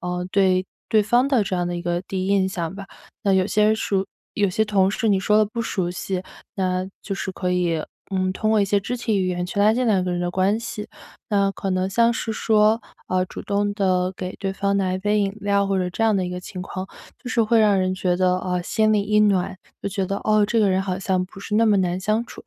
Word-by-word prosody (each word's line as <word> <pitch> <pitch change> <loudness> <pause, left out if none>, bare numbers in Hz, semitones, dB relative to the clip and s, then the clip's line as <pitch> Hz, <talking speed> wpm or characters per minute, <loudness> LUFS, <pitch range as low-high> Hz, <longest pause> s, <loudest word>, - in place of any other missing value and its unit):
呃， 180 0 -3
对 190 -2 +3 0.2
对 215 -1 +4
方 240 +5 +3
的 255 -6 +3
这 190 - -2
样 175 0 -1
的 175 - -3
一 175 - -5
个 175 0 -1
第 185 0 -3
一 - - -2
印 195 -1 +2
象 170 -2 -3
吧， 200 -1 -8 0.4
那 195 - +2
有 190 -1 +3
些 210 0 +2
人 215 +1 +4
熟 195 -2 -1 0.3
有 205 -2 +2
些 220 +4 +1
同 195 -3 +2
事 220 +1 -1
你 195 -2 +3
说 210 +2 +3
得 215 - +5
不 225 +3 -5
熟 185 -5 -2
悉， 180 +1 -3 0.3
那 185 -1 -1 0.2
就 195 - -4
是 190 - -4
可 180 -1 -2
以， 170 -3 0 0.3
嗯， 185 -1 0
通 215 +3 -1
过 220 -1 +4
一 - - +3
些 200 +1 +2
肢 245 +5 -3
体 225 -3 -1
语 185 - 0
言 175 -1 -2
去 200 - -5
拉 210 +2 +5
近 250 +1 0
两 190 -4 +2
个 180 - -2
人 175 - -2
的 175 0 -1
关 190 +4 +1
系。 215 -3 -6 0.4
那 200 -2 +2
可 195 - -4
能 185 +1 0
像 235 +4 +3
是 225 - -3
说， 220 0 +2 0.3
呃， 185 0 +1
主 - - -9
动 205 0 -1
地 185 -2 +1
给 185 0 -6
对 195 -1 -3
方 200 0 0
拿 190 -2 0
一 185 - -1
杯 210 +2 +1
饮 195 -1 0
料， 200 0 +1
或 195 -1 0
者 180 -1 0
这 225 +5 -1
样 220 -2 +3
的 185 -2 0
一 - - -4
个 180 0 -4
情 180 0 -8
况， 185 0 -5 0.3
就 250 - -7
是 230 - +3
会 225 +1 +3
让 205 -3 +4
人 185 0 0
觉 185 -1 0
得， 185 0 +2
呃， 180 -1 -2
心 215 +4 +2
里 210 - +3
一 210 +1 +1
暖， 195 -3 +2 0.2
就 - - -3
觉 195 -1 -2
得， 195 +2 -2
哦， 215 -1 +4
这 225 +2 +1
个 205 - +4
人 190 0 +1
好 185 -1 -3
像 185 -1 0
不 190 +1 -13
是 210 +1 -4
那 225 +1 +4
么 210 -3 +4
难 180 -1 0
相 215 +4 0
处。 - - -12
195 Hz, 290 characters per minute, -23 LUFS, 185-210 Hz, 0.4 s, 得